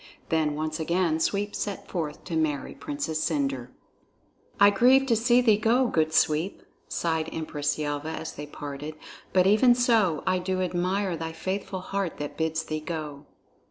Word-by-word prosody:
Then 155 -2 +1
once 155 +1 -3
again 170 0 +1
Sweep 205 +5 0
set 205 -2 -4
forth 155 -5 -4
to 170 - -4
marry 150 -3 -1
Princess 230 - -3
Cendre. 135 -5 -1 0.9
"I 200 0 +8
grieve 255 +6 +5
to 240 -4 +3
see 240 +2 +4
thee 220 -4 +4
go, 235 +4 +3
good 160 -8 +1
Sweep," 160 +4 +1 0.2
sighed 160 -1 -1
Empress 150 -2 -2
Yelva 145 0 -3
as 160 - -5
they 150 - -7
parted, 145 +1 -7 0.4
"but 185 -1 +4
even 220 +5 +5
so 225 - +2
I 185 0 +2
do 185 +1 -2
admire 185 +1 0
thy 165 0 -5
faithful 190 +2 -4
heart 195 -2 -3
that 145 0 -5
bids 160 0 -1
thee 155 -1 -3
go." 150 -2 -6
165 Hz, 160 wpm, -27 LUFS, 155-200 Hz, 0.9 s, I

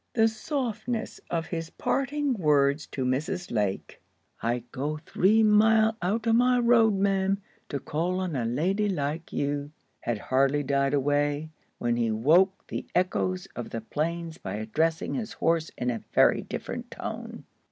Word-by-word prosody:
The 225 -1 +5
softness 230 -1 -3
of 165 -1 -1
his 165 -1 -4
parting 280 - 0
words 150 - +2
to 130 - -3
Mrs. 160 +9 -2
Lake, 105 -4 -2 0.4
"I'd 120 +1 -1
go 145 +3 -2
three 195 +7 +3
mile 220 +1 +5
out 215 +6 0
of 225 - +3
my 250 +1 +4
road, 235 -3 +4
ma'am, 195 0 +1 0.3
to 140 - -2
call 175 +6 -1
on 185 -5 -2
a 125 - 0
lady 180 - 0
like 160 -2 -3
you," 145 0 -2 0.3
had 120 -2 -2
hardly 135 +6 +1
died 140 +1 +1
away, 145 +2 0 0.3
when 120 0 0
he 115 -1 +1
woke 165 - +3
the - - -5
echoes 185 +1 0
of 120 - -5
the 115 - -4
plains 165 +6 -3
by 95 - -5
addressing 155 +10 -1
his 225 -4 -3
horse 165 -1 +1
in 125 0 0
a 115 - -4
very - - +5
different - - -6
tone. - - -6
165 Hz, 155 wpm, -27 LUFS, 140-210 Hz, 0.4 s, The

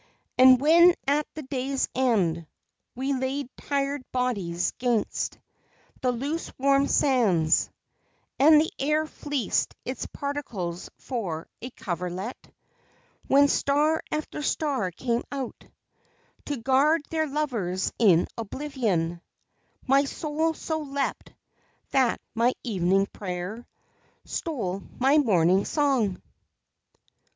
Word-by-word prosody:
And 255 0 +7
when 340 +5 +6
at 290 +2 +2
the 310 - -6
day's 265 0 -1
end 185 -11 +1 0.5
We 265 +3 -1
laid 265 0 -3
tired 280 0 -2
bodies 200 -9 -1
'gainst 240 -3 -1 0.6
The 255 - +2
loose 280 +7 -3
warm 275 +1 +3
sands, 195 - +3 0.7
And 300 +2 +7
the 315 - 0
air 300 +3 +1
fleeced 290 -7 -2
its 255 - -4
particles 230 -12 -5
for 185 - -4
a 250 - -5
coverlet; 180 +1 -5 0.8
When 280 +1 +6
star 295 +3 +2
after 305 0 -3
star 280 -10 0
came 235 +6 -1
out 270 -3 -6 0.8
To 290 - -3
guard 270 +6 +3
their 315 -1 0
lovers 235 -11 -2
in 185 -7 +5
oblivion 215 - -2 0.6
My 275 +1 +4
soul 315 +3 -1
so 315 +1 -3
leapt 280 -2 -3 0.6
that 260 -3 +2
my 235 +2 +2
evening 195 -3 +2
prayer 195 +4 -6 0.6
Stole 200 - -3 0.2
my 275 +4 +4
morning 190 - +3
song! 260 - 0
260 Hz, 105 wpm, -26 LUFS, 200-285 Hz, 0.8 s, And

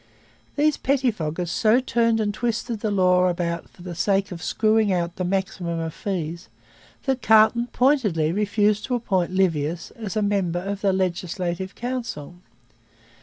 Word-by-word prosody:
These 300 0 +2
pettifoggers 210 - -1
so 220 +5 +3
turned 230 -3 +1
and 205 -1 0
twisted 230 0 -2
the 215 - -1
law 185 -2 +3
about 170 -1 -2
for 175 - -16
the 180 -1 -6
sake 195 +3 0
of 170 -2 -7
screwing 215 +1 +2
out 175 -1 -1
the 185 - -2
maximum 180 -2 -2
of 165 -1 -4
fees 175 -3 -4 0.6
that 265 -2 0
Carleton 220 +2 +5
pointedly 230 - +2
refused 210 +2 +1
to 250 - -1
appoint 190 -7 0
Livius 170 -3 0
as 220 -3 -6
a 215 - +1
member 195 -4 0
of 195 +2 -4
the 200 - +3
Legislative 185 0 -2
Council. 240 - -5
195 Hz, 150 wpm, -23 LUFS, 175-220 Hz, 0.6 s, Carleton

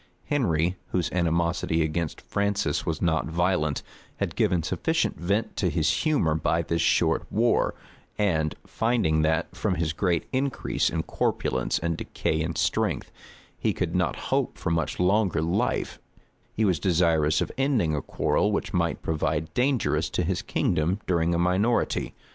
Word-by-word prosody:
Henry, 90 - +1
whose 85 -6 -1
animosity 85 -1 +1
against 80 0 -2
Francis 100 -7 -1
was 80 0 -2
not 80 -2 +1
violent, 85 -3 0 0.3
had - - -2
given 90 -3 +2
sufficient - - 0
vent 100 +6 -1
to 95 - +1
his 80 -3 +1
humor 150 - +2
by 80 +1 +1
this 85 0 -1
short - - +2
war; 115 +4 +2 0.4
and 80 -7 +1
finding 110 -10 +1
that, 80 +3 0
from 95 0 0
his 80 -2 -1
great 85 -1 0
increase 135 0 0
in - - -2
corpulence 60 -1 -1
and 85 0 -2
decay 80 - -2
in 80 +1 -2
strength, - - 0 0.5
he - - +1
could - - -2
not - - +1 0.2
hope - - 0
for - - -2
much 80 -2 -1
longer 95 0 +2
life, 80 +2 -1 0.5
he 110 - 0
was 90 -6 +2
desirous 80 -2 +2
of - - -1
ending 125 - +1
a 75 - -1
quarrel 105 +9 0
which 100 - -2
might 85 -2 0
prove 80 -1 -2 0.3
dangerous 125 - +1
to 90 - -1
his 90 +2 -1
kingdom 85 +6 0
during 85 -1 +1
a - - +1
minority. 95 +7 +1
85 Hz, 155 wpm, -26 LUFS, 80-100 Hz, 0.5 s, given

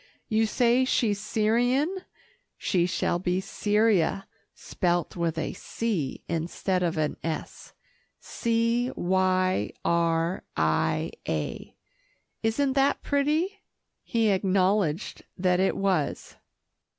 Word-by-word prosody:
You 220 -1 +2
say 245 +3 +3
she's 225 -5 +1
Syrian. 245 - +1 0.6
She 175 -2 +1
shall 175 -1 0
be 180 0 0
Cyria, 200 -2 +1 0.3
spelt 175 -1 -1
with 170 -2 -1
a 160 - -2
'C' 195 - -3
instead 175 +3 -1
of 170 -2 0
an 155 -1 -1
'S' 160 -1 -5 0.5
C 230 +1 0
y 185 - +1 0.2
r 170 +1 +1 0.2
i 80 0 +1 0.2
a 75 -2 -3 0.7
isn't 265 +5 +1
that 275 0 +2
pretty?" 310 +8 0 0.4
He 230 -3 +1
acknowledged 190 -2 +1
that 180 -1 +2
it 190 - +1
was. 190 -7 -1
190 Hz, 100 wpm, -27 LUFS, 175-230 Hz, 0.7 s, say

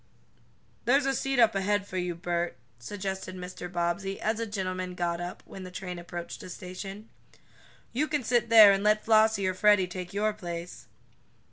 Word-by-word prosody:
"There's 270 +3 +4
a 270 - +2
seat 270 0 -1
up 230 -2 +5
ahead 200 +1 0
for 185 - -5
you, 180 -1 -2
Bert," 175 0 -2 0.2
suggested 190 - -5
Mr. 180 -1 -7
Bobbsey, 175 +3 -2
as 220 +1 -1
a 230 - -2
gentleman 185 -3 -3
got 170 -1 -1
up, 175 0 -6
when 190 - -10
the 185 - -7
train 180 -1 -6
approached 175 0 -7
a - - -9
station. 195 +4 -8 0.9
"You 290 +6 +1
can 295 -3 -1
sit 235 -1 +1
there, 220 -3 +10
and 195 0 +1
let 215 0 +3
Flossie 220 -2 +4
or 185 - +1
Freddie 205 0 +4
take 180 0 -7
your 210 +2 0
place." 175 -3 -7
190 Hz, 175 wpm, -28 LUFS, 180-215 Hz, 0.9 s, there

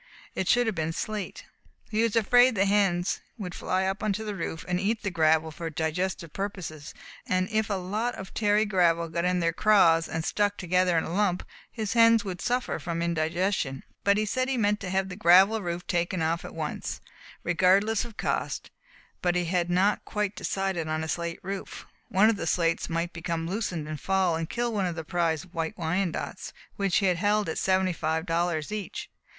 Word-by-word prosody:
It 190 - -2
should 245 0 +4
have 220 - 0
been 160 -2 -2
slate. 210 +2 -4 0.5
He 215 +1 +1
was 230 -1 +1
afraid 245 +2 +5
the 195 0 +3
hens 195 -3 +1 0.2
would 185 -5 -5
fly 185 +1 -1
up 190 +1 -2
onto 215 0 -1
the 210 - -3
roof 165 -3 -5
and 180 0 0
eat 215 +3 -1
the 200 - -1
gravel 160 -1 +3
for 165 +1 -5
digestive 165 +2 -2
purposes, 180 -7 -5 0.3
and 185 0 +1
if 220 -1 +1
a 200 - 0
lot 210 +6 -2
of 190 0 -9
tarry 210 0 +2
gravel 170 -4 +2
got 170 +2 -1
in 180 0 +1
their 165 0 +1
craws 165 -5 +4
and 160 0 -3
stuck 205 -1 +1
together 180 -1 +2
in 160 - +2
a 165 - -5
lump, 190 -2 +1 0.3
his 220 -3 -3
hens 230 -1 +5
would 185 -2 -5
suffer 250 +1 -1
from 170 -1 -3
indigestion. 170 -3 -1 0.2
But 200 0 +4
he 215 - +1
said 255 +4 -1
he 265 - 0
meant 210 -2 +2
to 190 - -5
have 190 +1 0
the 185 - -7
gravel 195 +3 +5
roof 175 -1 -4
taken 175 0 0
off 165 +1 0
at - - -9
once, 155 -2 -4 0.4
regardless 195 +5 +3
of 235 -3 -10
cost, - - -2 0.5
but 175 -1 +1
he 175 0 +1
had 175 0 0
not 190 +4 +2
quite 210 -2 -2
decided 190 -4 -2
on 155 0 -1
a - - -4
slate 170 +1 -3
roof. 195 +1 -6 0.2
One 195 +4 +5
of 225 -2 +2
the 170 - -3
slates 165 0 +1
might 170 +1 -2
become 165 0 -3
loosened 180 -5 -3
and 155 -1 -5
fall 190 -3 +2
and 160 0 -3
kill 240 -1 -1
one 195 -3 0
of 175 - -3
his 160 -2 -6
prize 165 -2 0
White 165 -3 -4
Wyandottes, 175 +1 -2 0.2
which 195 -2 +1
he 195 - +2
held 205 +3 +2
at 160 - -2
seventy 185 -1 +2
five 160 0 -1
dollars 170 -1 -1
each. 210 -4 -5
185 Hz, 200 wpm, -27 LUFS, 165-205 Hz, 0.5 s, afraid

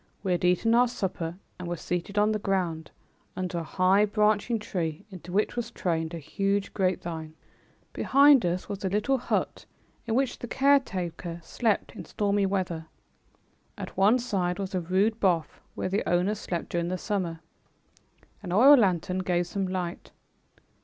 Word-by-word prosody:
We 190 - -1
had 175 - 0
eaten 180 +6 +3
our 245 +1 +5
supper 180 -7 -4 0.2
and 180 - -6
were 175 0 -3
seated 180 +5 -4
on 210 +1 +4
the 215 - -1
ground, 175 -6 -1 0.5
under 180 -2 -3
a - - -4
high, 185 +5 +3
branching 215 +2 +1
tree 175 -5 -4
into 180 -1 -10
which 205 +3 0
was 240 -1 -3
trained 165 -6 -2
a - - -4
huge 195 +6 -1
grapevine. 170 -5 -2 0.6
Behind 280 -2 +5
us 175 +1 -1
was 200 -2 -6
a 190 - 0
little 215 +7 +1
hut, - - -2 0.4
in 225 - 0
which 265 0 0
the 240 - -6
caretaker 185 - 0
slept 220 +5 -1
in - - -8
stormy 200 -1 0
weather. 180 -4 -2 0.9
At - - -7
one 200 +6 +5
side 190 -8 -1
was 195 -1 -4
a 185 - 0
rude 195 +6 +1
booth 175 -5 0
where - - -2
the 200 +3 0
owner 180 +4 +2
slept 180 -5 -4
during 170 0 -1
the 185 +1 -2
summer. 180 -5 -3 1.0
An 185 -4 -6
oil 255 +10 +8
lantern 185 -4 +1
gave 175 -1 0
some 190 +2 -3
light. 180 -2 -4
190 Hz, 165 wpm, -27 LUFS, 175-210 Hz, 1.0 s, oil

